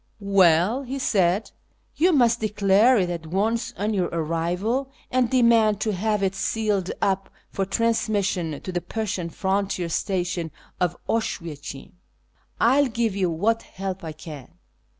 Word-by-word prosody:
'•' - - -8
AYell," 190 +4 +4
he 270 +1 -5
said, 195 -5 +1 0.2
" - - -42
you 355 +4 +4
must 240 -6 +3
declare 210 +3 +4
it 180 -3 +1
at 165 -2 -5
once 225 +6 0
on 210 +3 -1
your 185 -3 +1
arrival, 175 - -1 0.2
and 255 -2 +2
demand 230 -5 +4
to 215 0 0
have 210 +1 0
it 190 0 +1
sealed 200 -1 -1
up 195 0 0 0.2
for 195 - -1
transmission 200 -8 0
to 185 - -5
the 175 -1 -2
Prussian 195 -6 -3
frontier 190 -1 -1
station 180 -1 -1 0.3
of 175 -2 0
Oswiecim. 155 -11 -4 0.7
I 260 +5 +5
will 280 - +1
give 230 -3 -1
you 190 -3 +1
what 210 +8 +1
help 190 -1 -6
I 160 -1 -5
can." 150 -4 -10
195 Hz, 150 wpm, -24 LUFS, 175-225 Hz, 0.7 s, I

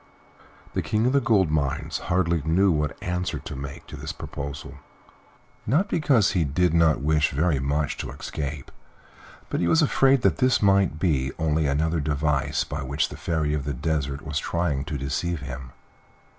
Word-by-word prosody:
The - - 0
King 110 +1 0
of 125 - +2
the 140 - +4
Gold 105 -9 +3
Mines 75 +2 -1
hardly 85 -3 +2
knew 90 +6 +3
what 75 -2 -1
answer 90 +1 -2
to 75 - -7
make 70 +1 -7
to - - -9
this - - -5
proposal. 70 0 -7 0.9
Not 155 - +2
because 135 - +3
he 90 -4 +1
did 80 +4 +1
not 80 -4 +3
wish 75 +1 +2
very 75 +1 +1
much 70 +2 -1
to - - -5
escape, 70 -2 -6 0.8
but - - 0
he 85 - +1
was 160 - +4
afraid 135 -3 +3
that - - +3
this 130 -1 +3
might 100 -6 +3
be 70 -6 +1
only 80 -1 +1
another 80 +4 +1
device 75 -1 0
by 70 +2 -5
which 70 +3 -1
the - - -8
Fairy 80 -3 -1
of 75 -2 -1
the 70 -1 -3
Desert 70 0 -2
was 75 -2 -2
trying 75 -6 -1
to 75 0 -3
deceive 70 +4 -2
him. 65 -1 -7
75 Hz, 175 wpm, -25 LUFS, 70-90 Hz, 0.9 s, the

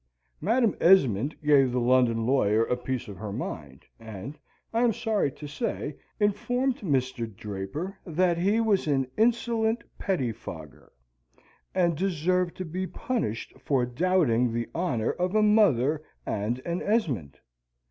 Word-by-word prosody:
Madam 225 +4 +2
Esmond 140 - +4
gave 140 -4 +5
the 125 - 0
London 120 -2 +3
lawyer 115 -4 +3
a 125 - 0
piece 125 0 -4
of 100 -2 -8
her 105 +1 -6
mind, 75 - -6
and, 110 +4 -8 0.4
I 230 - +2
am 240 -2 +3
sorry 210 - 0
to 150 - -10
say, 150 - -3 0.2
informed 245 +5 +1
Mr. 130 - -1
Draper 105 - -6
that 175 0 +1
he 200 +5 +2
was 210 -7 +2
an 135 -3 +2
insolent 230 0 +1 0.2
pettifogger, 115 - -4 0.8
and 175 -3 +2
deserved 180 0 0
to 185 - -4
be 185 +3 -3
punished 220 - -3
for 130 -4 +1
doubting 125 -4 +2
the 115 0 -3
honour 130 -11 0
of 180 +3 -2
a 215 - +4
mother 160 - +4 0.2
and 110 +5 -2
an 170 +1 -2
Esmond. 150 - -1
150 Hz, 135 wpm, -27 LUFS, 120-195 Hz, 0.8 s, gave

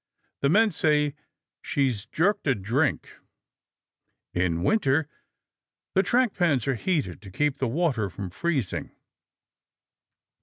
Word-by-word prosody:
The 140 - +2
men 220 +6 +4
say, 150 -4 +2 0.5
"She's 125 -6 -1
jerked 190 - +1
a 135 - +3
drink." 120 +9 -1 1.2
In 85 -1 0
winter, 150 - +2 0.9
the 190 - +4
track 245 +2 +2
pans 145 - +1
are 135 - +2
heated 135 - -1
to 100 - -11
keep 145 +8 0
the 130 - 0
water 130 - 0
from 95 0 -7
freezing. 140 - -2
140 Hz, 115 wpm, -26 LUFS, 110-170 Hz, 1.2 s, men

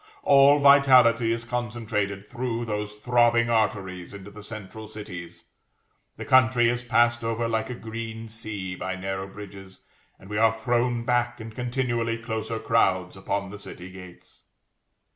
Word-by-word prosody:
All 140 +1 +6
vitality 130 -5 +6
is 115 0 -2
concentrated 110 -4 -3
through 120 -1 -3
those 105 -1 -4
throbbing 120 +1 +2
arteries 95 -5 -1
into 100 0 -10
the 105 +1 -11
central 110 0 -9
cities; 85 -6 -9 0.7
the - - -6
country 120 -2 +4
is 120 0 -1
passed 120 -1 +2
over 115 +1 -1
like 110 -1 -1
a 125 - -4
green 115 0 -7
sea 110 -4 -6
by 95 +1 -4
narrow 95 0 -4
bridges, 95 -1 -12 0.3
and 95 - -16
we 105 +1 -2
are 115 0 +5
thrown 120 +1 0
back 120 -1 0
in 110 0 -8
continually 120 -1 -2
closer 115 -1 -4
crowds 95 -5 +1
upon 100 0 -3
the 105 - -9
city 90 -2 -10
gates. 90 -2 -14
115 Hz, 145 wpm, -25 LUFS, 100-120 Hz, 0.7 s, All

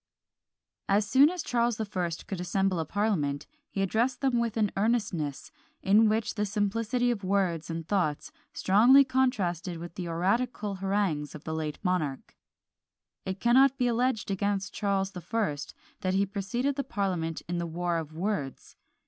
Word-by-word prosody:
As 200 +1 +3
soon 270 +7 +6
as 355 -2 -4
Charles 235 -2 +1
the 220 - -2
First 180 -5 -3
could 190 -3 -5
assemble 185 0 0
a 160 - -1
parliament, 155 -8 -1 0.2
he 195 - -1
addressed 230 +7 0
them 260 -3 +2
with 230 -1 -1
an 210 -2 +2
earnestness, 195 - -1 0.3
in 210 +3 +5
which 220 +1 0
the 210 - -1
simplicity 230 +4 0
of 215 -4 -4
words 185 -4 0
and 165 -1 -4
thoughts 175 -8 -1 0.2
strongly 240 +8 +6
contrasted 200 - 0
with 170 +1 -8
the 175 -1 -5
oratorical 200 +4 -1
harangues 190 -7 -1
of 150 - -10
the 160 - -4
late 155 -1 -3
monarch. 170 -8 -2 0.9
It 190 +1 -3
cannot 265 +4 +5
be 250 - +1
alleged 240 -3 0
against 200 0 -1
Charles 195 -2 0
the 180 - -8
First, 195 -10 -2 0.2
that 185 0 -1
he 200 +1 +3
preceded 215 +8 -2
the 280 - 0
parliament 180 -8 -2
in 175 0 -2
the 170 - -2
war 170 +1 -1
of 155 -2 -7
words. 160 - -4
195 Hz, 165 wpm, -28 LUFS, 175-225 Hz, 0.9 s, soon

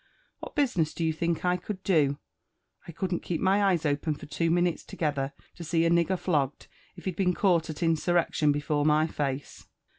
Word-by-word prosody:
What - - -9
business 210 - +1
do 165 - -1
you 160 - +1
think 170 +2 -1
I 180 0 +2
could 185 +1 -7
do? 145 -7 +2 0.7
I - - -6
couldn't 180 +1 -2
keep 170 - -3
my 195 +2 +3
eyes 180 -5 +2
open* 150 +1 0
for - - -10
two 165 +3 -1
minutes 175 0 +1
together, 140 -4 -2 0.3
to 175 - -7
see 165 +1 +1
a 165 - +3
nig— 170 -1 +3
ger 190 - 0
flogged, 150 -6 -1 0.3
if - - -13
he'd 185 -3 -2
been 180 -2 +1
caught 170 -5 +2
at 155 +2 -4
insurrection 165 -2 +2
before 145 0 0
my 155 +1 +4
face." 140 -3 -4
165 Hz, 200 wpm, -28 LUFS, 150-180 Hz, 0.7 s, my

